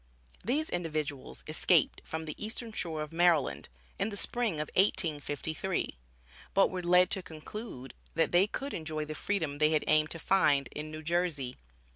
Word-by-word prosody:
These 290 +9 0
individuals 155 -6 -3
escaped - - +3
from 160 0 -5
the 155 - -4
eastern 225 +1 -3
shore 160 -7 -2
of 150 - -9
Maryland, 170 -3 +2 0.3
in 200 - +1
the 205 - -3
Spring 240 -1 +2
of 150 0 -3
1853, 160 - 0 0.6
but 195 - +5
were 185 -1 -3
led 180 +1 +5
to 190 - +2
conclude 160 - -8 0.2
that 165 - +2
they 180 +3 +5
could 275 +6 -4
enjoy 155 -2 -3
the 155 - -5
freedom 160 -5 -2
they 155 0 +5
had 155 -1 +2
aimed 155 0 +4
to - - -5
find, 150 -6 +3
in 150 +1 -5
New 155 0 -7
Jersey. 155 -6 0
165 Hz, 165 wpm, -31 LUFS, 150-190 Hz, 0.6 s, but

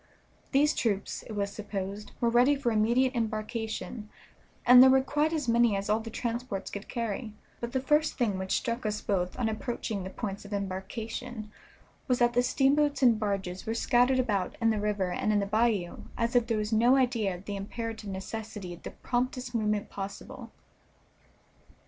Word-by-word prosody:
These 295 +2 +4
troops, 205 -5 -1
it 220 - -7
was 200 -1 -2
supposed, 200 0 -5
were 235 - +2
ready 250 +5 +5
for 270 -4 0
immediate 235 +4 +3
embarkation, 220 0 -3 0.6
and 250 0 +9
there 260 - +9
were 265 0 +5
quite 295 +3 +1
as 305 -5 -2
many 235 -2 +4
as 195 +1 -1
all 215 - +3
the 225 0 -7
transports 235 -3 -3
could 200 0 -6
carry, 230 -2 -3 0.3
but 235 0 -4
the 260 - 0
first 300 +4 +2
thing 210 -7 0
which 190 0 0
struck 235 +1 -2
us 210 -1 -1
both 180 -3 -1
on 245 - 0
approaching 220 -2 -3
the 185 - -5
points 200 0 -5
of 205 +1 -8
embarkation 215 +4 -5 0.6
was 250 -2 +2
that 240 0 +3
the 245 - +4
steamboats 280 +3 +2
and 235 -4 +5
barges 195 -3 -3
were 225 - -1
scattered 245 +3 +3
about 210 -7 0
in 225 -1 +3
the 215 - 0
river 205 -3 0
and 215 - 0
in 210 - +3
the 200 - 0
bayou 215 -4 +1 0.2
as 235 +1 0
if 240 -1 +4
there 225 - 0
was 210 +1 -2
no 240 +4 +5
idea 235 -7 +1
of 180 +3 -12
the 205 - -4
imperative 220 +1 -5
necessity 195 -1 -6
of 175 - -12
the - - -6
promptest 250 0 -2
movement 210 -2 0
possible. 195 0 -7
225 Hz, 185 wpm, -29 LUFS, 205-245 Hz, 0.6 s, and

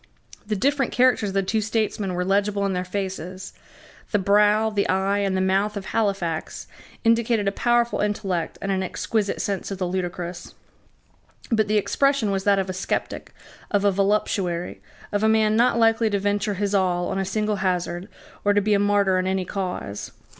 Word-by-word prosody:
The 215 - 0
different 270 +4 +1
characters 250 -4 +3
of - - -6
the 195 - +2
two 215 +3 0
statesmen 210 -3 -1
were 180 0 -1
legible 200 +1 +1
in 195 - 0
their 180 0 -1
faces. 185 -1 -5 0.6
The 210 - +2
brow, 210 +2 +3
the 205 -1 0
eye, 195 +2 +1
and 195 -2 0
the - - +1
mouth 195 +3 +1
of 195 - -6
Halifax 195 -8 -2 0.4
indicated 230 -2 +2
a - - +3
powerful 240 +3 +1
intellect 195 -4 -2
and 195 - -1
an 190 -1 0
exquisite 205 +2 -2
sense 200 -3 -2
of 195 - -4
the 185 - -2
ludicrous; 175 -1 -4 1.0
but 220 -2 +2
the 215 +1 +2
expression 275 +1 +1
was 195 -1 -2
that 200 -1 +4
of 195 -1 0
a 185 - -3
sceptic, 190 - -3 0.4
of 205 -1 +1
a 200 - +5
voluptuary, 195 -3 -1 0.3
of 205 - 0
a 220 - +3
man 215 -1 +3
not 235 +1 +3
likely 225 -1 +3
to 205 - 0
venture 205 +1 -1
his 200 +1 -1
all 180 -2 +1
on 195 - -2
a - - 0
single 210 +2 -1
hazard, 180 0 -2 0.3
or 205 - +3
to - - +5
be 210 +1 +1
a 200 - +3
martyr 200 -2 +2
in 185 - -1
any 190 -1 0
cause. 180 - -5
200 Hz, 190 wpm, -23 LUFS, 190-215 Hz, 1.0 s, a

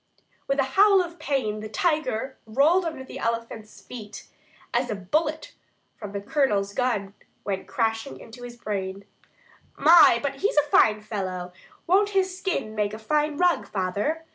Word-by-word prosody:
With 275 - 0
a - - +5
howl 400 0 +6
of 345 0 -10
pain 245 -7 -1
the 215 0 -7
tiger 300 - -1
rolled 305 +11 +3
under 315 -5 -4
the - - -9
elephant's 230 -2 -4
feet, 215 -4 -9 0.5
as 245 +1 +1
a 215 - -1
bullet 300 - -2 0.4
from 210 -3 -8
the 200 - -4
Colonel's 205 -6 0
gun 210 -6 -1 0.3
went 195 -2 -3
crashing 225 - -2
into 235 - -12
his 240 -1 -9
brain. 200 -3 -4 0.7
"My! 315 -5 +7
but 275 -1 -2
he's 405 - -1
a 295 0 +3
fine 210 -1 +4
fellow! 185 -4 -5 0.3
Won't 400 +4 +3
his 375 -1 +1
skin 365 - -3
make 210 -1 -1
a - - -7
fine 295 +6 0
rug, 355 0 +2
father?" 205 - -2
240 Hz, 160 wpm, -25 LUFS, 210-310 Hz, 0.7 s, My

